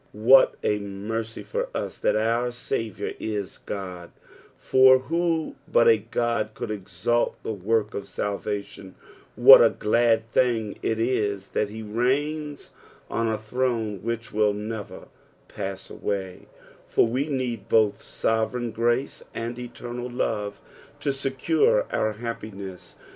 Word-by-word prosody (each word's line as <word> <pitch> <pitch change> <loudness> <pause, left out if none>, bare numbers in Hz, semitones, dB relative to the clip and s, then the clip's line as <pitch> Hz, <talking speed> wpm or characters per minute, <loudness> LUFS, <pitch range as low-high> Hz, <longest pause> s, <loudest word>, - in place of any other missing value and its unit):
What 120 +6 +6
a 105 - +1
mercy 105 +3 -5
fur - - -2
ua - - -2
that - - +2
our 115 +3 +1
Saviour 115 -4 -3
is 105 -3 -4
Ood, 90 -3 -5 0.5
for 130 0 +6
who 165 +4 -1
but 115 - +5
a 115 - +7
Ood 115 0 -1
could 110 - -4
execute 105 +3 -1
the 110 - -3
work 105 +2 0
of 100 0 -5
salvation 100 -2 -4
t - - -30 0.4
What - - +10
a - - +6
glad 115 0 +2
thing 115 -5 +1
it 110 0 -1
is 105 -5 0
that 105 - -1
he 110 +1 -7
reigns 145 +7 -1 0.4
on 115 - 0
a 110 -1 0
throne 110 -3 -2
which 115 +1 -4
will 105 -1 +3
never 105 0 -6 0.4
pass 95 0 -6
awuy, 95 -3 -4 0.4
for - - +3
we 130 +6 -1
need 125 -6 -3
both 105 -2 +3
sovereign 115 +2 -1
grace 120 +4 0
and 120 +1 -4
eternal 120 0 -6
love 105 -4 -2 0.4
to 140 - 0
secure 330 - +2
our 110 0 0
happiness. 105 -4 -7
115 Hz, 135 wpm, -25 LUFS, 105-125 Hz, 0.5 s, What